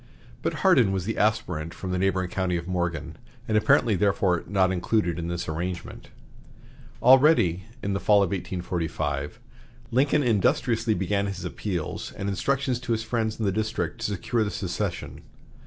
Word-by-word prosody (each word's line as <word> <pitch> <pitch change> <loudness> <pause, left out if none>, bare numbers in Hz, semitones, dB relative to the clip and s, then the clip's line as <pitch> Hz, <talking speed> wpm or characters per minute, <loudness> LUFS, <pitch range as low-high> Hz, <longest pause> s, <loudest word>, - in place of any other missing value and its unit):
But - - -1
Hardin 95 - +5
was 95 -2 -2
the 115 - -2
aspirant 85 -7 0
from 95 - -5
the 90 - 0
neighboring 95 -1 0
county 95 -2 0
of 85 0 -6
Morgan, 90 -2 -2 0.3
and 110 - 0
apparently 110 +1 +4
therefore 95 -2 +1
not 95 -2 +2
included 90 -1 0
in 85 - -3
this 85 0 -3
arrangement. 85 +3 -5 0.9
Already, 125 - +5 0.2
in 100 - -1
the 100 - -1
fall 105 -1 +4
of 95 - -1
1845, 80 -6 -3 0.5
Lincoln 140 +4 +3
industriously 120 -1 +2
began 100 +1 0
his 95 -2 -5
appeals 90 -2 -4
and 100 - -5
instructions 130 +5 0
to 120 -1 -2
his 110 0 -1
friends 110 -1 -2
in 110 - 0
the 100 - +2
district 105 -5 -2
to - - -3
secure 110 +4 0
the 105 - -2
succession. 95 -1 -4
100 Hz, 160 wpm, -26 LUFS, 90-110 Hz, 0.9 s, Hardin